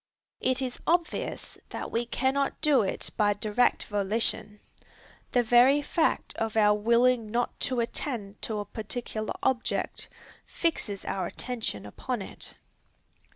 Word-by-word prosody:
It 260 +1 +1
is 250 -1 -3
obvious 340 0 -1
that - - -5
we 235 +1 -1
cannot 270 +3 0
do 295 -5 +4
it 195 - -2
by 205 -1 +4
direct 215 +4 +2
volition. 210 +1 -1 0.7
The 245 - +3
very 250 +5 +6
fact 320 +2 +1
of 225 0 -1
our 210 -1 +6
willing 235 +2 +3
not 240 +2 -1
to 250 -2 +1
attend 230 -4 -4
to 220 - -3
a 205 - -3
particular 215 +1 -4
object, 255 -2 -1 0.4
fixes 215 - -2
our 185 -2 -1
attention 225 - -4
upon 225 - -4
it. - - -8
235 Hz, 130 wpm, -28 LUFS, 210-255 Hz, 0.7 s, very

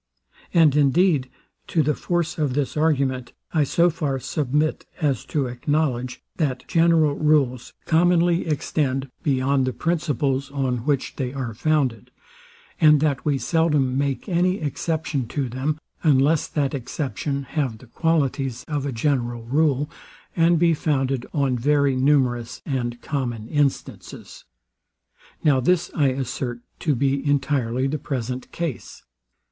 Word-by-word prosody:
And 160 -5 +5
indeed, 150 -1 +3 0.4
to 160 - +2
the 150 +2 +1
force 170 +1 -2
of 140 -4 0
this 140 -3 -1
argument 135 -5 0 0.2
I 155 -3 +3
so 170 +5 +3
far 140 -4 -2
submit, 150 +3 -1
as 145 -5 0
to 145 -3 -1
acknowledge, 125 0 -1
that 135 -6 -1
general 165 -3 +3
rules 140 -5 +1
commonly 170 +1 +3
extend 135 -3 -1
beyond 135 -1 +1
the 130 - -1
principles, 145 -5 -1
on 130 -4 -2
which 140 -3 0
they 130 -2 -3
are 130 -5 -4
founded; 130 -3 0 0.7
and 150 -2 +6
that 145 -4 +1
we 145 -2 +2
seldom 145 -1 +1
make 140 +4 -1
any 180 0 +2
exception 155 - -2
to 140 +2 -2
them, 130 +5 -2 0.2
unless 150 0 +3
that 140 -3 -1
exception 140 +1 -3
have 135 -5 -2
the 130 - -15
qualities 135 -3 -1
of 145 -3 -2
a - - -2
general 120 -2 -1
rule, 145 +3 +1 0.5
and 170 0 +4
be 170 0 +4
founded 135 -4 -1
on 135 -4 0
very 140 +1 +2
numerous 130 -3 +1
and 120 -4 -3
common 120 -6 -3
instances. 145 -2 -3 1.0
Now 145 -4 +4
this 175 +6 +1
I 145 -4 +2
assert 130 -2 -3 0.2
to 150 -3 +1
be 135 +2 0
entirely 135 -3 0
the 145 +3 -1
present 125 -2 -4
case. 165 -7 -5
140 Hz, 135 wpm, -23 LUFS, 130-155 Hz, 1.0 s, and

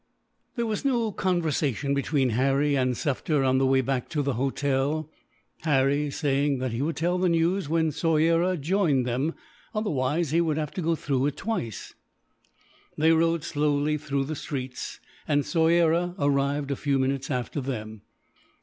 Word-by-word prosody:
There 235 -2 -1
was 215 -2 -2
no 240 -5 +1
conversation 155 - 0
between 140 -2 +1
Harry 135 +4 +2
and 130 -2 +1
Sufder 145 +2 0
on 130 0 +3
the 135 - +3
way 130 0 +4
back 130 -1 -2
to 150 -2 -1
the 140 -1 0
hotel; 140 +4 -1 0.5
Harry 145 -1 +2
saying 140 -1 0
that 130 -1 -2
he 115 +3 -3
would 155 +3 -1
tell 175 +2 0
the 185 0 +2
news 170 +1 +1
when 160 -1 +2
Soyera 165 +3 +2
joined 155 -5 +1
them, 130 +7 -1 0.4
otherwise 160 -6 0
he 165 +2 +3
would 160 -3 0
have 150 -2 -2
to 185 - -4
go 165 0 +1
through 140 -3 0
it 145 - -4
twice. 120 - -4 1.0
They 160 +2 +4
rode 165 -1 +2
slowly 150 0 0
through 140 -1 -1
the 155 +3 -4
streets, 130 -3 -5 0.3
and 145 -1 +2
Soyera 170 +1 +2
arrived 140 0 0
a - - 0
few 140 0 0
minutes 135 0 -1
after 130 +2 -2
them. 110 -5 -5
145 Hz, 160 wpm, -26 LUFS, 135-165 Hz, 1.0 s, way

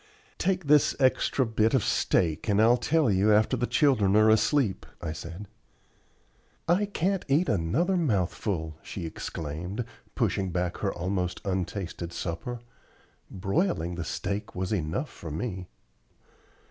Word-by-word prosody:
"Take 185 -2 0
this 150 0 +4
extra 130 0 +2
bit 110 +1 +2
of 125 - +2
steak 85 +3 +1
and 100 0 +3
I'll 115 +2 +6
tell 145 +1 +2
you 100 +3 +3
after 105 +1 +4
the 120 - -1
children 120 -10 +3
are 110 0 +6
asleep," 110 -2 +2
I 85 -2 -4
said. 85 +5 -8 1.2
"I 190 +5 +3
can't 195 -1 -1
eat 150 +6 +3
another 115 - +1
mouthful," 95 - -1
she 90 - -6
exclaimed, 80 +6 -5 0.3
pushing 95 -1 0
back 90 0 -2
her 100 - -1
almost 90 0 -2
untasted 90 -2 -3
supper. 90 +9 -4 0.7
"Broiling 95 - -1
the 85 0 -4
steak 100 +5 -4
was 95 +2 -2
enough 100 - -2
for 85 - -9
me." 90 +3 -4
100 Hz, 135 wpm, -28 LUFS, 90-130 Hz, 1.2 s, I'll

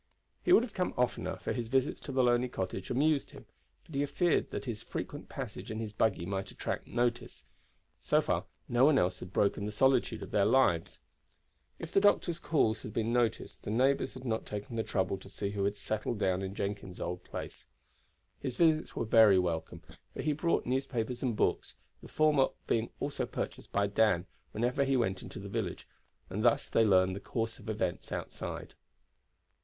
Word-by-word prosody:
He - - 0
would 240 - +8
have 235 -4 -6
come 180 -1 -1
oftener, 125 -1 0
for - - -3
his 120 -2 -3
visits 135 +4 +1
to 140 - -6
the 130 -1 +2
lonely 120 0 +3
cottage 95 -3 -4
amused 145 +3 +2
him; 135 -4 -13 0.4
but 160 - -14
he 140 +1 +1
feared 165 +4 +1
that - - -5
his 115 -4 -4
frequent - - -6
passage - - -6
in 110 - -4
his 110 -2 -4
buggy 105 -5 +1
might 95 +1 -3
attract - - -4
notice. 120 0 -1 0.6
So - - +3
far - - 0 0.2
no 120 +1 +3
one 145 0 +6
else 90 -3 +1
had 90 - -8
broken 100 +1 +1
the - - -3
solitude 130 +3 +2
of - - -9
their 100 - +3
lives. 105 -7 +2 0.8
If 165 - -7
the 195 - +4
doctor's 175 -4 +3
calls 125 -10 +1
had 105 - -7
been 115 +1 0
noticed, 120 -2 0
the - - -6
neighbors 130 +6 +2
had 130 0 -9
not 110 -2 -1
taken 105 +3 -6
the 115 - +1
trouble 95 -2 -1
to 95 - -13
see 100 0 -3
who 100 -1 -1
had 100 +1 -1
settled 110 +2 -2
down 95 -2 +1
in 95 0 -4
Jenkins' 100 -3 -4
old 90 +1 -4
place. - - -7 0.7
His 130 - -4
visits 160 -2 +3
were - - -1
very 110 -3 +7
welcome, 85 -3 -2 0.3
for - - -4
he 150 - +2
brought 165 +3 0
newspapers 125 -2 -1
and 125 -4 0
books, - - 0 0.3
the - - -11
former 150 -3 +3 0.2
being 115 0 0
also - - -2
purchased - - -5
by 100 0 +2
Dan 100 -3 +2 0.3
whenever 125 +5 +1
he 135 -1 +2
went 95 -6 0
into - - -9
the - - -6
village, - - -3 0.4
and 105 +4 -3
thus 120 -1 +3
they 115 - +3
learned 95 -2 +4
the - - -5
course 115 +1 -3
of - - -9
events 95 -5 -2
outside. - - -5
115 Hz, 195 wpm, -31 LUFS, 100-135 Hz, 0.8 s, would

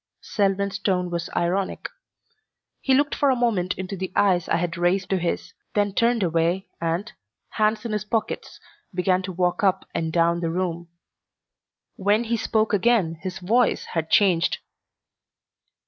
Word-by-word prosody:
Selwyn's 200 -1 0
tone 180 -3 0
was 170 -1 -3
ironic. 185 +3 -1 0.9
He 265 - +2
looked 290 +2 +2
for 285 - +2
a 260 - +4
moment 210 -7 0
into 190 +1 -5
the 190 0 -4
eyes 180 -4 +2
I - - +2 0.2
raised 180 +2 +1
to 190 - +2
his, 170 0 -3 0.2
then 205 -1 +1
turned 235 0 +2
away 170 +3 0
and, 170 +7 -2 0.4
hands 215 +1 0
in 230 - -3
his 210 -1 -1
pockets, 220 +1 -3 0.4
began 185 0 +2
to 185 0 -5
walk 180 +4 0
up 190 -2 +2
and 160 -1 -1
down 170 +1 +2
the 165 -1 -1
room. 175 -1 -2 1.1
When 205 +4 +2
he 235 0 -1
spoke 220 -1 0
again 205 -6 +2
his 185 -1 -5
voice 220 +7 +2
had 160 -1 -1
changed. 180 -4 +3
190 Hz, 150 wpm, -24 LUFS, 175-215 Hz, 1.1 s, a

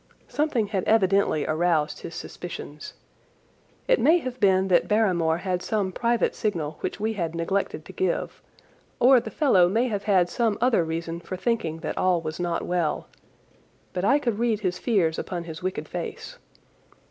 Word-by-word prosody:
Something 295 -7 0
had 195 -4 -1
evidently 195 -7 +3
aroused 155 -1 +1
his 165 - -8
suspicions. 150 -4 -8 0.9
It - - +4
may 330 +3 +5
have 255 -6 -5
been 190 -1 +3
that 175 - +3
Barrymore 180 -7 +2
had 180 0 -2
some 205 -3 -1
private 235 +4 +1
signal 160 -8 -2
which - - -4
we 220 +2 -1
had 170 -5 -3
neglected 190 +4 -2
to - - -11
give, 375 - -2 0.6
or 255 +1 +7
the 225 - -6
fellow 195 - +4
may 230 +6 +1
have 205 -2 -3
had 190 -4 +4
some 220 +2 0
other 235 -7 +3
reason 165 +1 -4
for 185 +2 -6
thinking 180 -7 -1
that - - -3
all 185 -2 +3
was 160 0 -6
not 175 -1 -1
well, 175 -3 -1 0.8
but 180 - -2
I 260 +8 +4
could 235 -7 -2
read 230 -3 +1
his 180 -3 -1
fears 185 -9 +1
upon 175 -2 -4
his 160 -1 -8
wicked 185 +1 -3
face. - - -6
190 Hz, 170 wpm, -25 LUFS, 170-225 Hz, 0.9 s, or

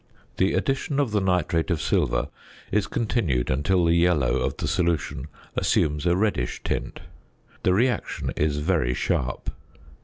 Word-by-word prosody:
The 95 - +2
addition 135 +1 0
of 135 -6 +1
the 105 -1 +1
nitrate 90 -3 +1
of 85 -4 +1
silver 60 -1 0 0.4
is 105 -1 +1
continued 100 - 0
until 85 +7 +2
the 85 - +4
yellow 85 -8 +3
of - - -2
the - - -2
solution 85 -5 -1 0.3
assumes 75 +2 +1
a 85 - +4
reddish 100 - -1
tint. - - -3 0.6
The 90 - +3
reaction 120 +4 0
is 75 -1 0
very 75 -6 +1
sharp. 60 0 -1
85 Hz, 145 wpm, -25 LUFS, 75-95 Hz, 0.6 s, the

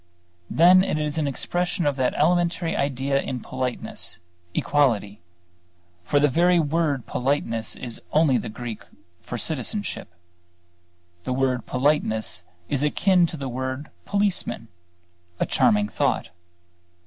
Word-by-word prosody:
Then 180 +3 +6
it 175 - -1
is 150 +1 -1
an 150 - 0
expression 175 +5 -1
of 145 -1 +2
that 130 -1 +1
elementary 170 +1 +1
idea 140 0 0
in 130 - -4
politeness 130 -7 -4 0.4
equality. 110 -9 +1 0.8
For 145 - +3
the 145 - +5
very 175 +5 +4
word 150 -4 0
politeness 120 -4 -1
is 120 -3 -7
only 150 -5 +4
the 115 - -5
Greek 115 0 -6 0.4
for 120 - -5
citizenship. 160 - -2 1.2
The 130 - -2
word 130 -2 0
politeness 125 -9 0 0.2
is 140 - -1
akin 175 +4 +3
to 165 - -6
the 135 -2 -4
word 130 +3 -4
policeman: 200 - -1 0.7
a - - +2
charming 105 0 +3
thought. 95 - 0
140 Hz, 125 wpm, -24 LUFS, 125-165 Hz, 1.2 s, Then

